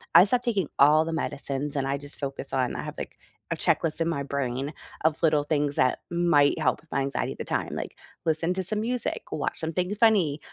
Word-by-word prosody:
I - - +10
stopped 245 +4 +3
taking 205 -9 0
all 155 +3 +6
the 165 - -3
medicines 145 -2 -2
and 135 -1 -1
I 140 +1 -1
just 145 +1 -2
focus 135 -1 -4
on 130 -2 0
I - - -4
have - - -7
like - - -7 0.3
a - - +1
checklist 165 0 +1
in 165 - +1
my 140 -4 -2
brain 140 +1 -3 0.3
of 160 -1 +1
little 155 -3 +3
things 145 -1 0
that 130 -1 +2
might 170 -5 +3
help 145 -4 0
with 160 - -29
my 135 - 0
anxiety 135 +1 -2
at - - -17
the - - -4
time, - - -2
like, - - -6 0.3
listen 165 +2 +1
to 190 0 0
some 210 +4 +4
music, 245 +1 -2
watch 150 - -2
something 180 +4 -1
funny, 200 -10 +3
155 Hz, 220 wpm, -26 LUFS, 140-175 Hz, 0.3 s, I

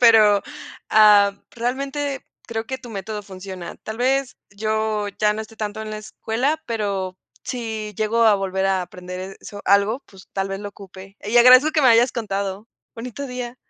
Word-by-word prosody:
pero, 215 -4 +7 0.5
ah, 205 -2 +6
realmente 275 +3 -3 0.2
creo 225 -1 -3
que 260 +3 -5
tu 255 -2 -11
método 210 0 -5
funciona, 185 -2 -8
tal 220 +1 -6
vez 265 +1 +1
yo 215 0 -1
ya 210 -1 +3
no 215 - -4
esté 220 0 -10
tanto 215 0 -4
en 215 - -6
la 215 - -4
escuela, 235 +8 -2
pero 200 -5 -2 0.3
si 220 -4 -4
llego 225 +2 +1
a 215 -3 +6
volver 190 0 -1
a 190 -1 +1
aprender 180 +2 -8
eso 205 -1 -9
algo, 200 +6 +3
pues 195 -1 -16
tal 195 0 -1
vez 195 +1 -4
lo 205 - -5
ocupe 195 0 -13
y 220 +4 0
agradezco 255 +5 +8
que 305 - +2
me 260 - +7
hayas 235 +1 +5
contado, 200 -2 -3 0.3
bonito 250 +4 -6
día. 250 -1 -6
215 Hz, 175 wpm, -22 LUFS, 200-240 Hz, 0.5 s, agradezco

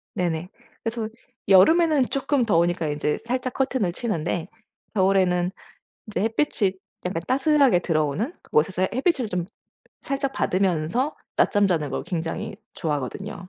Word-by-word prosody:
네네. 175 0 -1 0.3
그래서 225 -1 -2 0.4
여름에는 290 - +5
쪼끔 275 -1 +1
더우니까 175 -4 +2
인제 150 0 -1
살짝 255 +1 -2
커튼을 260 -9 0
치는데 175 -6 -2 0.5
겨울에는 185 -2 +3 0.6
이제 215 - -2
햇빛이 220 -3 +1 0.3
약간 180 -2 -2
따스하게 275 - +4
들어오는 160 - 0
그곳에서 185 +4 +1
햇빛을 260 - +1
좀 180 -2 -2 0.6
살짝 275 -1 -2
받으면서 190 - 0 0.2
낮잠 205 -1 +4
자는 160 -6 0
걸 - - -2
굉장히 180 +5 -4 0.2
좋아하거든요. 150 +3 -4
195 Hz, 320 characters per minute, -24 LUFS, 170-250 Hz, 0.6 s, 여름에는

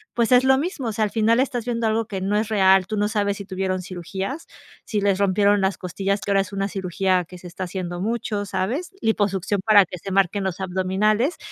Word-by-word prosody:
pues, 235 0 +1
es 250 0 +6
lo 265 0 +5
mismo. 290 -4 -3
O - - -2
sea, 215 +1 0
al 205 - -4
final 225 +1 +2
estás 255 -3 -1
viendo 235 -1 -1
algo 220 +1 0
que 195 -3 -4
no 195 +2 0
es 215 0 -1
real. 190 -3 +4
Tú 215 - -3
no 205 0 +2
sabes 205 -2 -1
si 200 - -8
tuvieron 185 -1 -2
cirugías, 190 - -5 0.4
si 215 - -1
les 200 -1 +1
rompieron 200 +1 +3
las 190 0 0
costillas, 195 +2 -2
que 205 - -3
ahora 195 0 +4
es 195 - -6
una 195 0 -1
cirugía 185 -1 0
que 180 +2 -12
se 180 - -16
está 180 +2 -5
haciendo 175 -1 -5
mucho, 210 -1 -2
¿sabes?, 240 - -2
liposucción 205 -2 0
para 205 -3 +7
que 180 - -8
se 195 - -7
marquen 195 +1 +1
los 190 -2 -3
abdominales, 190 - 0
200 Hz, 230 wpm, -23 LUFS, 190-220 Hz, 0.4 s, para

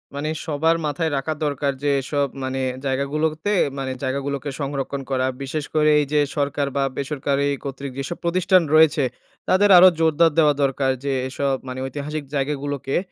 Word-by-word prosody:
মানে 150 +2 -2 0.2
সবার 160 +2 +1
মাথায় 155 +2 -1
রাখা 145 +4 -2
দরকার 140 -1 0
যে, 145 - +2
এসব 140 +1 -1 0.2
মানে 130 0 -2 0.2
জায়গা 135 +1 0
গুলোতে, 155 +6 0 0.3
মানে 130 -1 -3
জায়গাগুলোকে 140 +2 -2
সংরক্ষণ 140 0 -3
করা। 130 -1 +1 0.2
বিশেষ 145 +2 -3
করে 155 0 +4
এই 145 - +1
যে, 150 - +4 0.2
সরকার 140 0 0
বা 140 - +2
বেসরকারি 140 0 -1 0.2
কর্তৃক 140 -1 -6
যেসব 135 +6 -4
প্রতিষ্ঠান 185 +2 +3
রয়েছে, 155 -2 +5 0.5
তাদের 205 +2 +4
আরো 185 +1 +9
জোরদার 160 0 +4
দেওয়া 150 -2 +5
দরকার 135 0 +1
যে, 140 - 0 0.2
এসব 135 0 -1
মানে 130 0 -5
ঐতিহাসিক 145 +3 -5
জায়গাগুলোকে, 140 -1 -2
145 Hz, 160 wpm, -22 LUFS, 135-155 Hz, 0.5 s, আরো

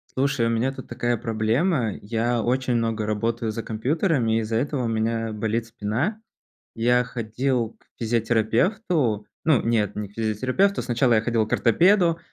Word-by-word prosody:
Слушай, 135 -3 +1
у - - +1
меня 115 +4 +1
тут 135 -1 -10
такая 120 0 -1
проблема. 115 - 0
Я 115 +2 0
очень 125 +1 0
много 115 -2 0
работаю 110 +1 -1
за 115 +1 -4
компьютерами, 120 - 0
из-за 110 0 -2
этого 135 +2 -1
у - - 0
меня 115 0 -1
болит 110 +2 -2
спина. 120 - -2 0.5
Я 125 +2 +3
ходил 120 0 -2
к - - -30
физиотерапевту. 120 - +1 0.2
Ну, 155 -6 +3
нет, 110 -3 0
не 105 -1 -4
к - - -22
физиотерапевту, 130 - +1
сначала 120 0 +2
я 110 - +3
ходил 115 -2 0
к - - -3
ортопеду. 170 - +4
115 Hz, 155 wpm, -24 LUFS, 110-130 Hz, 0.5 s, ортопеду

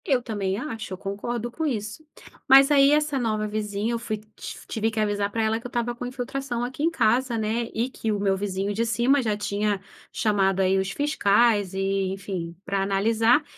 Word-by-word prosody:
Eu 265 -4 +3
também 200 -5 -2
acho, 225 -6 -5
eu - - -5
concordo 230 +5 -4
com 320 - -4
isso. 215 -2 -3 0.5
Mas 270 +2 +8
aí, 280 -1 +6
essa 300 -2 +2
nova 215 -3 -1
vizinha, 210 +1 -2
eu 235 - -1
fui, 220 -2 -3 0.2
tiv - - -8
tive 220 0 -1
que 220 0 -4
avisar 205 -1 0
para 225 +1 0
ela 220 +1 +1
que 235 - -7
eu - - -13
estava 240 0 -1
com 245 - -6
infiltração 250 -1 -4
aqui 255 +3 -5
em 325 - +3
casa, 245 -4 +1
né, 225 +2 -1
e 230 +3 -1
que 225 -4 -3
o 205 - -1
meu 195 -1 +2
vizinho 195 0 -2
de 225 +3 0
cima 235 +5 +2
já 215 -4 -1
tinha 205 0 -1 0.3
chamado, 195 -3 +1
aí, 190 0 +3
os 190 0 -1
fiscais, 210 - +2
e 195 0 0
enfim, 185 -3 -5
pra 195 +1 -1
analisar 225 +7 +3
220 Hz, 205 wpm, -25 LUFS, 200-245 Hz, 0.5 s, Mas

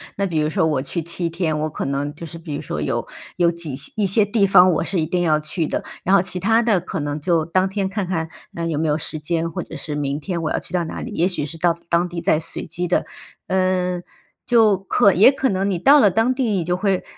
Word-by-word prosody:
那 200 - 0
比 165 -5 -1
如 150 0 +1
说 160 - +1
我 145 -4 0
去 165 +5 -3
7 170 +1 -1
天， 165 -2 -1
我 155 +1 -1
可 - - -5
能 140 +2 -2
就 165 - -8
是 165 +1 -9
比 160 -3 -6
如 - - -4
说 - - -4
有 - - -2 0.3
有 175 -1 +3
挤 165 -5 -4 0.2
一 210 - +2
些 195 +3 +3
地 205 0 +2
方， 185 -1 +6
我 165 - 0
是 180 -2 -1
一 - - 0
定 180 +3 -1
要 155 -3 +3
去 155 +1 -2
的， - - -2 0.2
然 190 - +4
后 195 - +5
其 185 0 -4
它 225 +5 +3
的 220 -5 +2
可 170 - -5
能 145 +1 -3
就 165 +1 +1
当 185 +4 +1
天 195 0 -2
看 195 -1 -3
看， 165 -3 -2 0.3
呃， 170 - -3
有 155 -3 -1
没 160 - 0
有 150 - +1
时 155 0 -4
间， 165 +2 -2
或 - - -4
者 - - -10
是 150 0 -5
明 140 -1 -2
天 175 0 -3
我 160 - -1
要 - - 0
去 - - -8
到 175 -2 0
哪 160 - -6
里。 - - -6
也 170 - +1
许 175 -6 -2
是 165 +3 -8
到 170 0 +2
当 170 +1 +2
地 175 -1 -5
再 155 - +2
随 165 +1 -2
机 175 +2 -3
的。 175 - +1 0.4
嗯， 185 -1 0 0.4
就 220 -5 +4
可 195 +1 +3
也 205 +7 +7
可 265 -1 0
能 195 +1 0
你 190 - 0
到 280 +11 +6
了 205 - +6
当 225 +7 +2
地 260 0 -1
你 190 -4 0
就 180 +2 -1
会 195 -1 0
175 Hz, 285 characters per minute, -21 LUFS, 160-190 Hz, 0.4 s, 也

